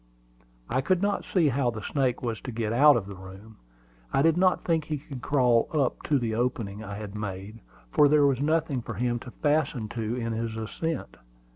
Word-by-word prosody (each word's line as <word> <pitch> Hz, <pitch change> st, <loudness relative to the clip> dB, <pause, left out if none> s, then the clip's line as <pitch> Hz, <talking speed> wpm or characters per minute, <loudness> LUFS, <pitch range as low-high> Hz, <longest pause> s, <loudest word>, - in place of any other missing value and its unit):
I 130 Hz, +2 st, 0 dB
could 185 Hz, +6 st, +2 dB
not 205 Hz, 0 st, 0 dB
see 170 Hz, -6 st, +2 dB
how 130 Hz, -1 st, +1 dB
the 110 Hz, -3 st, -6 dB
snake 130 Hz, -4 st, 0 dB
was 115 Hz, -2 st, -3 dB
to 130 Hz, -, -6 dB
get 110 Hz, -1 st, -2 dB
out 145 Hz, +2 st, +7 dB
of 105 Hz, -, -3 dB
the 100 Hz, -, -8 dB
room. 95 Hz, +4 st, -12 dB, 0.5 s
I 135 Hz, -, +2 dB
did 165 Hz, 0 st, +4 dB
not 185 Hz, 0 st, +2 dB
think 165 Hz, -3 st, +1 dB
he 155 Hz, -1 st, -2 dB
could 135 Hz, -2 st, -9 dB
crawl 125 Hz, -5 st, +3 dB
up 140 Hz, -5 st, +1 dB
to 145 Hz, -, +3 dB
the 115 Hz, -4 st, -1 dB
opening 110 Hz, -3 st, -2 dB
I 100 Hz, -1 st, -6 dB
had 105 Hz, -1 st, -7 dB
made, 105 Hz, +1 st, -6 dB, 0.3 s
for 145 Hz, -, +5 dB
there 145 Hz, 0 st, +5 dB
was 135 Hz, -2 st, +2 dB
nothing 155 Hz, -3 st, +1 dB
for 120 Hz, -1 st, -6 dB
him 120 Hz, +2 st, 0 dB
to 125 Hz, -, -10 dB
fasten 145 Hz, -5 st, 0 dB
to 115 Hz, 0 st, -3 dB
in 115 Hz, -2 st, -2 dB
his 110 Hz, 0 st, -3 dB
ascent. 160 Hz, +9 st, -4 dB
125 Hz, 210 wpm, -27 LUFS, 110-145 Hz, 0.5 s, out